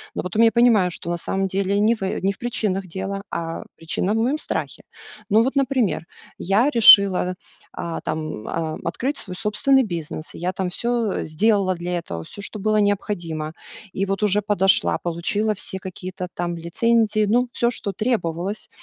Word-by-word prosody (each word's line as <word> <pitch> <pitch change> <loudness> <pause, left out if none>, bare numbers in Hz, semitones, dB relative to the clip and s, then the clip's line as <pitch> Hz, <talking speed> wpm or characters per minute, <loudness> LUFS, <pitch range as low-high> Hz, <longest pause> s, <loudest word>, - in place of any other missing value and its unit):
но - - -2
потом 180 +5 +1
я 225 - +6
понимаю, 230 -7 +4
что 170 - -6
на 175 - -1
самом 195 +3 -1
деле 195 +1 0
не 220 +2 +4
в, 220 - -6
э, 190 - -2
не 195 +1 +2
в 195 - -10
причинах 205 -5 -2
дело, 195 +3 -4
а 165 0 -4
причина 175 +4 -2
в - - 0
моем 245 +7 +1
страхе. - - -4 0.5
Ну 220 +2 +5
вот, 270 +3 -1
например, 260 - +1 0.3
я 205 +9 +2
решила, 200 -7 +7 0.4
а, 170 -1 -4
там, 155 -8 -4
ам, 160 -1 -3
открыть 265 - -2
свой 185 -4 -5
собственный 260 +7 +2
бизнес, 165 -6 -5
я 180 +2 -2
там 185 -1 -2
всё 235 +2 -1
сделала 195 +3 +2
для 175 +1 -3
этого, 85 - -5
всё, 200 - -9
что 210 +2 -6
было 215 +2 +1
необходимо. 175 -7 -1 0.4
И 195 +1 -1
вот 195 +2 -2
уже 210 0 +2
подошла, 195 -2 +2
получила 190 +6 -1
все 190 -1 -1
какие-то 185 -1 -6
там 175 0 -3
лицензии, 215 +5 +1
ну, 245 +3 +2
всё, 235 -1 +1
что 210 -4 -3
требовалось. 195 -3 -2
195 Hz, 175 wpm, -22 LUFS, 175-220 Hz, 0.5 s, решила